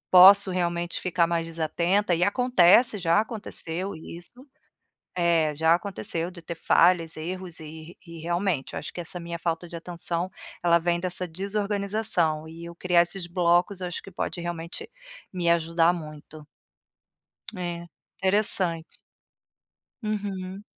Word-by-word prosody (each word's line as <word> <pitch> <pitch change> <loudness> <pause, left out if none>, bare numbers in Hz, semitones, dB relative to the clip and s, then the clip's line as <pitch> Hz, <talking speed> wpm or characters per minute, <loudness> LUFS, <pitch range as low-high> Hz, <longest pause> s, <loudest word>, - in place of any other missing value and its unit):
posso 195 +2 +9
realmente 175 -1 -2
ficar 175 -2 +2
mais 165 -1 -1
desatenta 170 +4 0
e 175 +1 +2
acontece, 215 -1 +4
já 170 +1 +3
aconteceu 200 -5 -3
isso. 175 - -11 0.7
É, 165 -3 +2
já 160 +2 +4
aconteceu 175 -2 -3
de 180 -1 -12
ter 170 - -5
falhas, 165 0 +3
erros 175 +1 -6
e 160 +2 -10
e, 170 -1 -10
realmente, 170 -3 -1
eu - - -3
acho 150 - -8
que 175 - -5
essa 175 +1 -6
minha 170 0 -6
falta 170 +1 -2
de 170 - -9
atenção 170 +1 -3 0.3
ela 170 -1 +5
vem 170 0 0
dessa 180 0 -2
desorganização. 200 -3 -1
E 165 +1 -10
eu 170 0 -9
criar 175 0 +3
esses 175 +1 -2
blocos 175 +2 +1
eu 180 - -2
acho 175 - -5
que 195 - -11
pode, 175 - -4
realmente, 170 - -5 0.5
me 175 -2 0
ajudar 165 0 +3
muito. 155 -2 -9 1.1
É, 175 -1 -5 0.3
interessante. 190 -4 0 1.1
Uhum. 200 -2 -4
175 Hz, 140 wpm, -26 LUFS, 165-185 Hz, 1.1 s, posso